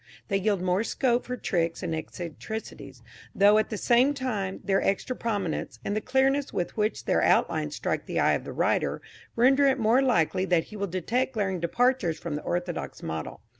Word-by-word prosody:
They 200 - +2
yield 195 -2 0
more 185 +3 +1
scope 245 0 0
for 250 0 -3
tricks 165 -6 -1
and 170 -2 -2
eccentricity, 175 +7 -6 0.4
though, 205 +2 +6
at 215 - -1
the 215 - -3
same 250 +6 +3
time, 215 -8 -3
their 195 -1 +1
extra 200 +6 -1
prominence, 205 -9 -3
and 205 - -1
the 215 - 0
clearness 265 +3 +1
with 175 - -3
which 215 0 -1
their - - +2
outlines - - +2
strike - - -2
the - - -1
eye - - +4
of - - -1
the - - -7
writer - - 0 0.4
render 270 +4 +5
it 265 0 +3
more 230 +2 +3
likely 190 - +2
that 175 -3 +2
he - - -7
will 200 -1 -2
detect 230 +9 -1
glaring 195 -4 -1
departures 175 0 +1
from 165 -1 -5
the 150 - -3
orthodox 175 0 -4
model. 80 0 -5
210 Hz, 190 wpm, -27 LUFS, 180-250 Hz, 0.4 s, though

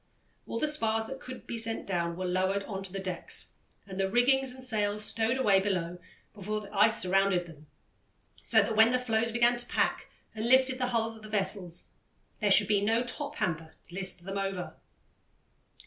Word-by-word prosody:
All - - -3
the 305 - +1
spars 225 -7 0
that 270 +3 -7
could 255 0 -9
be 235 - -3
sent 225 0 -1
down 170 -3 -2
were 185 - -3
lowered 190 +2 0
on 195 -2 -5
to 195 -1 -5
the 195 - -5
decks, 185 -2 -2 0.3
and 195 -1 -8
the 190 0 +1
rigging 245 +5 +4
and 260 -1 -2
sails 210 -3 0
stowed 225 +4 0
away 205 -7 +4
below 180 -3 -2 0.3
before 210 +1 -3
the 205 -1 -11
ice 215 +2 +4
surrounded 190 -1 +2
them, 155 -3 -14 0.7
so - - +4
that 225 - -2
when 220 +1 +7
the 250 - +2
floes 230 -2 0
began 240 +1 +3
to 240 - -3
pack - - 0 0.3
and 220 +1 -3
lifted 260 0 +4
the 250 - +1
hulls 225 -2 -1
of 220 - -13
the 215 - -10
vessels, 190 -4 -2 0.5
there - - +1
should - - +6
be 205 -2 +3
no 225 +3 +2
"top 285 +4 -4
hamper" 160 - -3
to - - -16
list 185 -2 -2
them 195 +2 -4
over. 195 -2 -4
210 Hz, 195 wpm, -30 LUFS, 190-235 Hz, 0.7 s, when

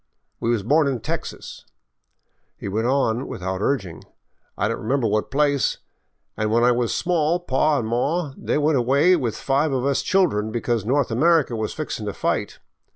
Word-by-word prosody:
We 115 - -1
was 115 -4 +1
born 150 +6 +3
in 130 -3 -1
Texas," - - -6 0.9
he - - -7
went 110 +4 -1
on 130 -2 +1
without 95 +1 -4
urging. 95 - -2 0.3
" - - -45
I 100 - +1
don't 115 - -3
remember 130 +3 0
what 105 0 0
place, 140 -1 +1 0.6
an' 110 0 -1
when 115 +2 +2
I 125 - +5
was 120 -1 0
small 170 -1 +1
paw 150 -2 +1
an' 120 - -2
maw 140 +7 -1
they - - -2
went 150 -2 +2
away 140 +9 +4
with 125 -9 -2
five 140 +3 +1
of 130 -1 -1
us 140 -1 +1
children 145 - +1
because 115 -2 -1
North 135 +1 +1
America 150 +1 +3
was 110 -1 -3
fixin* 130 -8 -4
to 100 - -3
fight. - - -2
130 Hz, 180 wpm, -22 LUFS, 110-150 Hz, 0.9 s, I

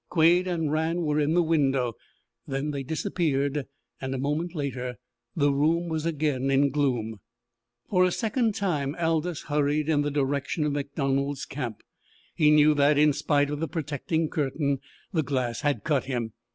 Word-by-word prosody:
Quade 175 +2 +4
and 165 -4 -1
Rann 160 +3 0
were 150 -1 +1
in 150 +2 +1
the 175 - +4
window. 135 -7 +1 0.5
Then 135 +2 -2
they 140 -1 -3
disappeared, 145 -2 -1 0.3
and 130 0 -3
a - - -2
moment 150 +6 -2
later 130 -4 -3 0.4
the 145 -3 +3
room 165 +5 +1
was 160 0 -1
again 145 -4 0
in 135 +1 +3
gloom. 120 -7 -1 0.7
For 180 -2 +3
a 180 - +3
second 225 +1 0
time 150 -7 -1
Aldous 165 0 0
hurried 150 +1 0
in 150 -2 +3
the 145 - 0
direction 140 +2 -1
of 150 - +1
MacDonald's 140 -1 -1
camp. 125 -6 -5 0.5
He 150 -2 +4
knew 150 0 +6
that, 145 0 +3
in 150 0 +5
spite 145 0 +1
of 150 - -3
the 165 - -1
protecting 155 +2 -2
curtain, 140 -2 -1 0.3
the 160 - +2
glass 130 -4 -2
had 145 -1 0
cut 145 -4 +1
him. 120 -4 -3
145 Hz, 165 wpm, -27 LUFS, 140-160 Hz, 0.7 s, knew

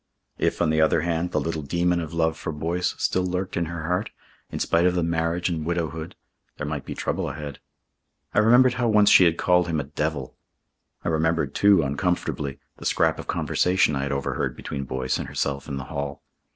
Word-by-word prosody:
If, - - +1
on 80 - +2
the 80 0 +2
other 80 0 +3
hand, 85 +1 -1
the - - 0
little 80 -1 -2
demon 85 +4 +1
of 80 -2 -5
love 80 -1 +1
for 80 - -5
Boyce 85 +4 -1
still 95 - +1
lurked 90 +1 -2
in 85 - 0
her 80 0 -5
heart, 90 +4 -1 0.4
in - - -4
spite 85 +2 +2
of 90 - +1
the 90 - +1
marriage 85 +1 0
and 85 -3 -2
widowhood, 80 -1 -3 0.4
there 75 - -4
might 75 -2 -4
be - - -6
trouble - - -2
ahead. 75 -2 -7 0.7
I - - +4
remembered 125 +4 +6
how 125 -2 0
once 105 -2 +5
she 90 - +8
had 85 -1 +2
called 90 -1 +3
him 80 -2 0
a - - -1
devil. 75 -1 -3 0.7
I - - +1
remembered, 80 -3 +1
too, 100 -5 +5
uncomfortably, 70 -1 -1 0.2
the - - -10
scrap - - +2
of - - -7
conversation 90 -4 +2
I 70 - -1
had 70 +1 -2
overheard 70 0 -2
between 70 -1 -5
Boyce 65 0 -2
and - - -4
herself 70 -1 -2
in 70 -2 -4
the 70 - -4
hall. 70 -1 -4
80 Hz, 205 wpm, -24 LUFS, 75-90 Hz, 0.7 s, she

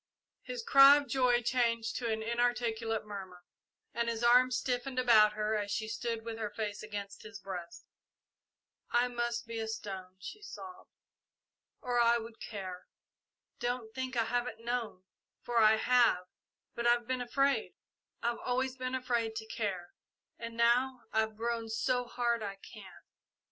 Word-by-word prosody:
His - - -6
cry 275 -9 +8
of 285 -1 -3
joy 250 -3 +2
changed 235 -2 +1
to 235 -2 -2
an 220 0 -2
inarticulate 230 -2 0
murmur, 190 -4 -8 0.5
and 235 +1 0
his 230 0 -3
arms 250 +1 +5
stiffened 255 +1 -2
about 220 -4 +6
her 215 0 -1
as 205 -1 -1
she 220 +2 -2
stood 230 0 -3
with 225 -1 -5
her 215 -2 -2
face 210 -1 -4
against 205 -2 -6
his 220 +1 -9
breast. 180 -3 -8 1.0
"I 245 +1 +2
must 240 -1 -2
be 230 0 -5
a 220 - -3
stone," 190 -4 -6
she 420 - -9
sobbed, 375 -2 -10 0.9
"or 245 -1 0
I 235 0 +5
would 230 0 -8
care. 185 -4 -7 0.7
Don't 240 -2 -3
think 260 -1 -4
I 230 - +4
haven't 240 -1 -2
known, 235 -6 -3 0.4
for 240 -1 +1
I 215 0 +7
have; 230 -5 +3 0.5
but 235 0 -1
I've 240 0 +3
been 255 +1 -2
afraid 275 +3 +1 0.5
I've 235 0 0
always 255 +1 -1
been 255 0 -2
afraid 240 -3 -1
to 220 0 -4
care, 195 -6 -4 0.5
and 230 0 -7
now 245 +2 +3
I've 220 -1 0
grown 230 0 -2
so 245 +3 0
hard 235 -1 0
I 200 -2 -4
can't! 195 - -13
235 Hz, 155 wpm, -32 LUFS, 220-245 Hz, 1.0 s, cry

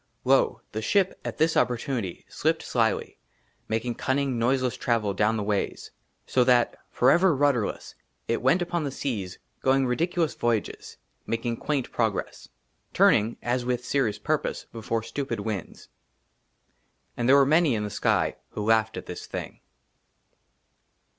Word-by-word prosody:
LO, - - +3
THE 110 - -3
SHIP, 190 - +1
AT - - -5
THIS 160 +1 +2
OPPORTUNITY, 120 - -1
SLIPPED - - -1
SLYLY, - - 0 0.5
MAKING 115 +2 -1
CUNNING 130 0 -1
NOISELESS 125 +1 +1
TRAVEL 110 -4 0
DOWN 105 +3 +1
THE 105 - -2
WAYS. 100 -1 -2 0.3
SO 125 - +3
THAT, 120 -1 +3
FOREVER 170 +7 +4
RUDDERLESS, 135 -5 0 0.3
IT 115 - 0
WENT 165 +8 +3
UPON 175 -1 -2
THE 145 - -2
SEAS 110 -9 -4 0.2
GOING 135 0 +3
RIDICULOUS 160 +3 0
VOYAGES, 115 -3 -2 0.3
MAKING 115 +1 -1
QUAINT 145 -4 -2
PROGRESS, 110 -4 -2 0.5
TURNING 110 +3 +4
AS 120 +1 0
WITH 125 0 -2
SERIOUS 120 -7 0
PURPOSE 150 +8 -2
BEFORE 115 0 -2
STUPID 120 -4 -4
WINDS. 100 -3 -5 1.3
AND 120 +1 0
THERE 135 - +8
WERE 140 -1 +6
MANY 155 -2 +3
IN 105 - -2
THE 105 - -4
SKY - - +1 0.2
WHO - - -4
LAUGHED 110 0 +2
AT - - -6
THIS - - -7
THING. - - -6
120 Hz, 140 wpm, -26 LUFS, 110-140 Hz, 1.3 s, THERE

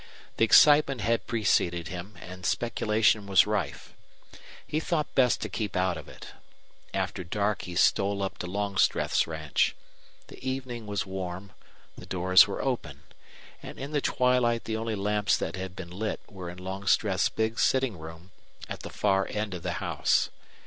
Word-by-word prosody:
The 115 - +5
excitement 145 0 +6
had 115 +3 0
preceded 85 -7 +1
him, 90 +4 -7
and 90 +1 -10
speculation 110 -1 +1
was 95 -1 +5
rife. 105 0 -3 0.7
He 155 - -1
thought 155 -2 -2
best 125 -2 +3
to - - -2
keep 110 -3 -4
out 90 -1 +1
of - - -9
it. - - -11 0.6
After 90 - -2
dark 105 +4 -1
he 90 - -7
stole 100 +2 +2
up 95 - -4
to 90 - -4
Longstreth's 100 +1 +1
ranch. 80 -1 0 0.5
The - - -14
evening 130 -4 -4
was 105 -1 -2
warm; 95 0 -6 0.4
the - - -11
doors 95 +1 +5
were - - -4
open; - - -3 0.6
and - - -9
in 140 +2 -6
the 145 -2 0
twilight 125 -3 +2
the 110 - -3
only 110 0 -2
lamps 105 +1 +1
that - - -3
had 95 -1 -6
been 85 -2 -8
lit 105 +4 -3
were 90 -3 -8
in 90 - -9
Longstreth's 95 +1 +1
big 110 +1 -2
sitting 130 -9 +1
room, 80 +3 -11 0.4
at - - -6
the - - -8
far 95 -2 +1
end 105 -2 -3
of 90 - -6
the - - -2
house. - - +1
100 Hz, 165 wpm, -28 LUFS, 90-115 Hz, 0.7 s, excitement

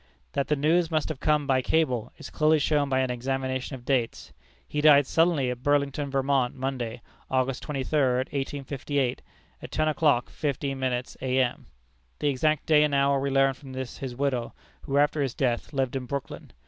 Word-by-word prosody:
That 140 - 0
the 150 - +2
news 160 +4 +2
must 155 -2 0
have 155 -4 -5
come 150 -1 +2
by 130 -2 +2
cable, 125 -6 0
is - - -10
clearly 155 +1 +3
shown 145 -1 +1
by 130 -1 +2
an 130 -1 0
examination 130 +1 -2
of 120 -2 -12
dates. 125 -4 -1 0.3
He 150 - -2
died 145 -2 +7
suddenly, 160 -4 +2
at 125 0 -6
Burlington, 145 0 +1
Vermont, 135 -2 +1
Monday, 130 -3 -4 0.3
August 130 0 0
twenty 140 -3 -3
third, 130 -3 +1
1858, 140 -1 -2 0.4
at - - -8
ten 155 0 0
o'clock 150 -6 +2
fifteen 140 -2 -2
minutes 125 -1 -2
A.M. 130 -1 0 0.5
The 145 - 0
exact 155 +2 +1
day 150 -1 +5
and 150 -2 +1
hour 140 0 +3
we 140 +1 -1
learned 135 -1 +3
from 135 -3 -11
his 130 0 -5
widow, 130 -3 -1 0.3
who 140 - -2
after 145 +1 +3
his 135 -3 -1
death 120 -3 -1
lived 135 -3 -1
in 130 -2 -3
Brooklyn. 140 -3 -6
135 Hz, 180 wpm, -27 LUFS, 130-145 Hz, 0.5 s, died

